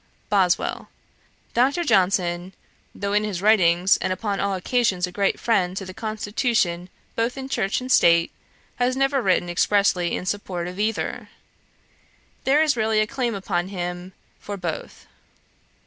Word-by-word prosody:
BOSWELL. 190 -4 +1 0.6
'Dr. 275 +8 +2
Johnson, 185 - +1 0.4
though 200 0 -3
in 210 +1 +2
his 205 -5 -3
writings, 185 -3 +4
and 185 - -2
upon 200 +1 -2
all 200 -1 0
occasions 190 -2 +1
a 180 - -9
great 195 +1 0
friend 190 -5 +1
to 195 - -4
the 185 - -8
constitution 215 -4 -1 0.3
both 230 +3 -1
in 265 0 -5
church 195 -7 -1
and 255 +1 -5
state, 170 -5 +5 0.5
has 250 +1 +1
never 270 0 +2
written 185 -4 +2
expressly 180 -1 +2
in - - -5
support 185 -3 -3
of 180 +2 -8
either. 215 +1 -2 1.2
There 290 +4 +4
is 305 -3 +2
really 220 -1 +1
a 215 - +3
claim 245 -2 -2
upon 175 -2 -2
him 180 -1 -5 0.3
for 205 0 -6
both. 175 -4 -6
200 Hz, 145 wpm, -23 LUFS, 180-225 Hz, 1.2 s, state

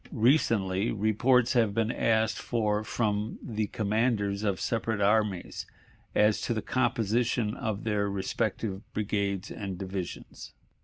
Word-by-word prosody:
Recently 115 -6 +2
reports 115 +4 +3
have 115 -5 +2
been 115 0 +1
asked 110 -2 +1
for 105 -2 0
from 105 -1 -1
the 110 -3 -3
commanders 105 -2 0
of 100 -3 0
separate 115 -2 -1
armies 100 -2 +1 0.5
as 105 0 +4
to 120 - -1
the 110 - -1
composition 115 -2 +1
of 110 -5 -3
their 105 -2 0
respective 100 +1 -2
brigades 100 -2 -1
and 95 -3 -5
divisions. 95 -1 -6
105 Hz, 120 wpm, -29 LUFS, 100-115 Hz, 0.5 s, as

